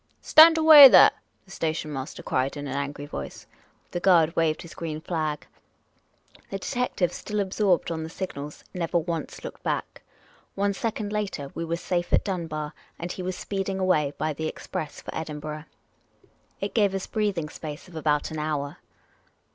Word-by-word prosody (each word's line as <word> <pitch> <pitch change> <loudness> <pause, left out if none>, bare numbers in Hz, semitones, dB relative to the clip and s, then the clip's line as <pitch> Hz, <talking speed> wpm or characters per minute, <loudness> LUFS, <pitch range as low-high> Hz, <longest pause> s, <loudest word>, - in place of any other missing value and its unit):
"Stand 325 +1 +8
away, 310 -3 +11
there," - - +8 0.3
the 195 - -17
station 160 -4 -3
master 135 0 -6
cried, 130 +3 -1
in 145 - -5
an 135 - -4
angry 140 +1 -4
voice. 145 - -7 0.5
The 175 - -2
guard 170 -3 +4
waved 165 0 +1
his 170 - -11
green 155 -2 -5
flag. 155 -3 -3 1.0
The 195 - -3
detective, 200 -5 -1
still 210 -1 -4
absorbed 190 -3 +1
on 160 -1 -3
the 160 - -5
signals, 150 -5 -7
never 175 -1 -1
once 165 -2 -4
looked - - -8
back. - - -3 0.5
One 200 0 +1
second 215 0 -3
later, 195 -10 -3
we 165 - -4
were 165 0 -2
safe 175 0 -2
at - - +3
Dunbar, 165 -6 -4 0.2
and 175 +1 -5
he 185 - -6
was 185 0 -3
speeding 195 -1 -3
away 155 -7 +1
by 155 0 -1
the 160 +2 -3
express 155 -1 -6
for - - -8
Edinburgh. 155 -1 -5 0.9
It - - -4
gave 200 -4 +2
us 190 - -3
a - - -21
breathing 200 -8 -1
space 150 +2 -8
of 180 - -15
about 150 -1 0
an 155 - -4
hour. 150 -2 -3
165 Hz, 170 wpm, -26 LUFS, 150-195 Hz, 1.0 s, away